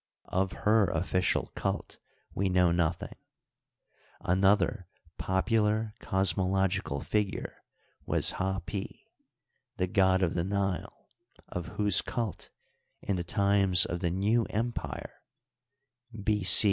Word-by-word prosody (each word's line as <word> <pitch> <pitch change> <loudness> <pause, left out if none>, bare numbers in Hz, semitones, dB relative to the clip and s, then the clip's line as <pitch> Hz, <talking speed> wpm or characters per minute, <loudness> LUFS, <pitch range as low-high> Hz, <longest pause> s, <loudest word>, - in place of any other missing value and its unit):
Of 95 0 0
her 105 -1 +4
official 90 +2 0
cult - - -4 0.3
we 95 0 0
know 90 -1 +3
noth 85 0 0
ing. - - -8 1.1
Another 95 +1 +2 0.3
popular 105 +2 0
cosmological 95 -5 0
figure 105 -2 -2 0.5
was - - 0
Hdpi, 95 +1 -3 0.9
the 90 - 0
fod 95 0 +3
of 85 - +1
the 85 - -1
Nile, 100 -1 -3 0.4
of 90 -1 -5
whose 105 -2 +3
cult 115 -6 -4 0.5
in 100 - -1
the 90 - -2
times 100 0 +3
of 85 - -4
the 85 -1 0
New 105 +6 +1
Impire 115 +3 -4 1.0
(B.C. 100 -3 +8
95 Hz, 110 wpm, -29 LUFS, 90-105 Hz, 1.1 s, B.C